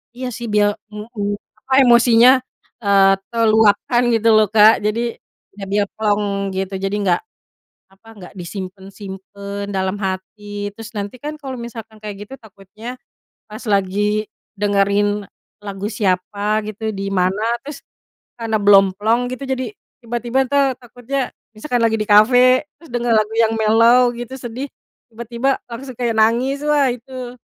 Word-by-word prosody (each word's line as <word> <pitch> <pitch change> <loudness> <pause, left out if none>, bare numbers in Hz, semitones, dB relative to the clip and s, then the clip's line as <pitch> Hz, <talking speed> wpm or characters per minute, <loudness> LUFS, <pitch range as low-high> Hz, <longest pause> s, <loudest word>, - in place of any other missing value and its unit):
Iya 255 +1 -5
sih, 240 -1 -6
biar 205 0 +3 0.2
ng 210 0 -8
ng 210 -4 -4 0.3
apa 265 - -3
emosinya, 240 -1 +6 0.5
eee, 195 -1 +5 0.2
terluapkan 225 +1 +3
gitu 225 -1 +1
loh, 215 -1 +5
Kak. 215 0 +6
Jadi 230 +3 -1 0.4
ya 200 - -9
biar 205 0 +1
plong 205 -2 -1
gitu, 190 +1 -3
jadi 195 +1 -1
nggak 180 -3 +2 0.7
apa, 195 +4 -22
nggak 180 - -11
disimpen-simpen 195 +2 -8
dalam 190 +1 -1
hati. 205 +1 -5
Terus 225 +1 -9
nanti 205 +3 -5
kan 295 +4 -5
kalau 265 -2 -6
misalkan 225 -2 -9
kayak 210 -1 -7
gitu, - - -17
takutnya 215 +3 -11 0.5
pas 215 0 -10
lagi 205 +1 0 0.3
dengerin 205 0 +1 0.4
lagu 200 0 -5
siapa 205 +1 0
gitu, 220 +1 -4
di 195 -1 -5
mana, 185 +4 +1 0.2
terus 285 0 -8 0.6
karena 225 -1 -1
belum 200 -1 +7
plong 225 +3 +2
gitu. 255 - -11
Jadi, 260 -1 -1 0.4
tiba-tiba 240 +3 -1
ntar 275 -1 +2
takutnya 245 +2 -4 0.3
misalkan 245 +2 -2
lagi 225 -1 +3
di 215 - -2
kafe, 250 +6 +5
terus 330 - -17
denger 240 -1 0
lagu 215 0 -1
yang 225 -1 +3
mellow 230 +3 +5
gitu, 240 +2 -7
sedih, 245 +2 -5 0.4
tiba-tiba 235 +4 -2
langsung 255 +1 -8
kayak 240 -2 0
nangis 240 +5 +2
wah 295 -2 +3
itu, 250 0 -8
220 Hz, 145 wpm, -19 LUFS, 205-240 Hz, 0.7 s, belum